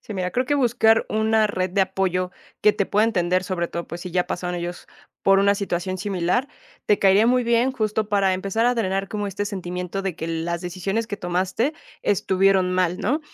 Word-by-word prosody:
Sí, 215 Hz, -, -8 dB
mira, 180 Hz, -1 st, -2 dB
creo 250 Hz, +5 st, -1 dB
que 290 Hz, -, +1 dB
buscar 230 Hz, -4 st, +3 dB
una 220 Hz, 0 st, +2 dB
red 185 Hz, -3 st, -2 dB
de 195 Hz, +2 st, +1 dB
apoyo 185 Hz, -1 st, 0 dB, 0.3 s
que 210 Hz, -, +6 dB
te 200 Hz, -, -1 dB
pueda 210 Hz, +2 st, +2 dB
entender, 185 Hz, -4 st, +1 dB
sobre 180 Hz, -2 st, -2 dB
todo, 170 Hz, -, -5 dB
pues, 170 Hz, +2 st, -7 dB
si 180 Hz, -, -7 dB
ya 180 Hz, +1 st, 0 dB
pasaron 180 Hz, 0 st, -3 dB
ellos 175 Hz, 0 st, -5 dB, 0.4 s
por 195 Hz, 0 st, +5 dB
una 200 Hz, 0 st, +4 dB
situación 185 Hz, -1 st, -3 dB
similar, 195 Hz, +7 st, 0 dB, 0.4 s
te 205 Hz, -, +3 dB
caería 195 Hz, +3 st, +5 dB
muy 250 Hz, +1 st, +3 dB
bien 235 Hz, +2 st, +2 dB
justo 215 Hz, -3 st, -1 dB
para 200 Hz, -2 st, +2 dB
empezar 195 Hz, +4 st, -1 dB
a 245 Hz, +1 st, +3 dB
drenar 195 Hz, -3 st, -1 dB
como 205 Hz, -1 st, -3 dB
este 200 Hz, +1 st, -3 dB
sentimiento 180 Hz, -1 st, -4 dB
de 190 Hz, -3 st, -3 dB
que 160 Hz, -, -5 dB
las 165 Hz, +1 st, -2 dB
decisiones 190 Hz, +5 st, -3 dB
que 205 Hz, -, -5 dB
tomaste 185 Hz, -, -1 dB, 0.3 s
estuvieron 190 Hz, -1 st, +2 dB
mal, 180 Hz, -1 st, +1 dB
¿no? 290 Hz, +5 st, 0 dB
195 Hz, 205 wpm, -23 LUFS, 180-215 Hz, 0.4 s, que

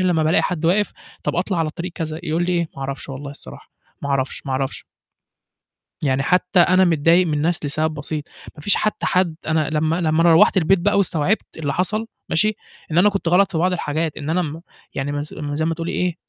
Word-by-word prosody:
لمّا 175 Hz, -3 st, +2 dB
بألاقي 155 Hz, +2 st, +3 dB
حد 170 Hz, -3 st, -2 dB
واقف، 200 Hz, +5 st, +2 dB, 0.3 s
طَب -, -, -1 dB
أطلع 180 Hz, +1 st, 0 dB
على 160 Hz, -2 st, 0 dB
طريق 175 Hz, +2 st, -6 dB
كذا، 160 Hz, -2 st, -4 dB
يقول 170 Hz, +1 st, 0 dB
لي 180 Hz, -, 0 dB
إيه، 170 Hz, -2 st, 0 dB
"ما -, -, -8 dB
أعرفش 135 Hz, +1 st, -5 dB
والله 140 Hz, +1 st, -6 dB
الصراحة 65 Hz, -, -12 dB, 0.3 s
ما 140 Hz, -, -3 dB
أعرفش، 135 Hz, -1 st, -1 dB
ما 135 Hz, -, -2 dB
أعرفش." 135 Hz, 0 st, -3 dB, 1.2 s
يعني 140 Hz, -1 st, +1 dB
حتى 180 Hz, +3 st, +2 dB
أنا 185 Hz, +2 st, +5 dB
متضايق 165 Hz, +2 st, +4 dB
من 155 Hz, -, -1 dB
الناس 155 Hz, +1 st, 0 dB
لسَبب 155 Hz, +2 st, 0 dB
بسيط 150 Hz, +1 st, -4 dB, 0.3 s
ما 150 Hz, -, -11 dB
فيش 205 Hz, -, +3 dB
حتى 215 Hz, -, -1 dB
حد 180 Hz, -3 st, +1 dB
أنا 155 Hz, -2 st, +1 dB
لمّا 155 Hz, +1 st, +1 dB
لمّا 160 Hz, +1 st, +2 dB
روّحت 165 Hz, +3 st, +5 dB
البيت 180 Hz, +2 st, +4 dB
بقى 205 Hz, +4 st, +2 dB
واستوعبت 185 Hz, 0 st, 0 dB
اللي 145 Hz, -3 st, -2 dB
حصل 215 Hz, +5 st, 0 dB, 0.2 s
ماشي، 215 Hz, +6 st, +2 dB, 0.4 s
إن 160 Hz, -, 0 dB
أنا 205 Hz, +4 st, +6 dB
كنت 195 Hz, -4 st, -3 dB
غلط 195 Hz, +3 st, +4 dB
في 165 Hz, -, -2 dB
بعض 180 Hz, +3 st, +2 dB
الحاجات، 155 Hz, -1 st, -2 dB
إن 150 Hz, +1 st, -5 dB
أنا 180 Hz, +2 st, +2 dB
م 160 Hz, 0 st, -5 dB, 0.3 s
يعني 135 Hz, +1 st, -2 dB
ما 145 Hz, -, -2 dB
نس 150 Hz, -, -6 dB
م 145 Hz, -2 st, -4 dB
زي 155 Hz, +1 st, 0 dB
ما 165 Hz, -, +1 dB
تقولي 165 Hz, +1 st, -4 dB
إيه، 180 Hz, -2 st, -1 dB
160 Hz, 220 wpm, -21 LUFS, 150-180 Hz, 1.2 s, أنا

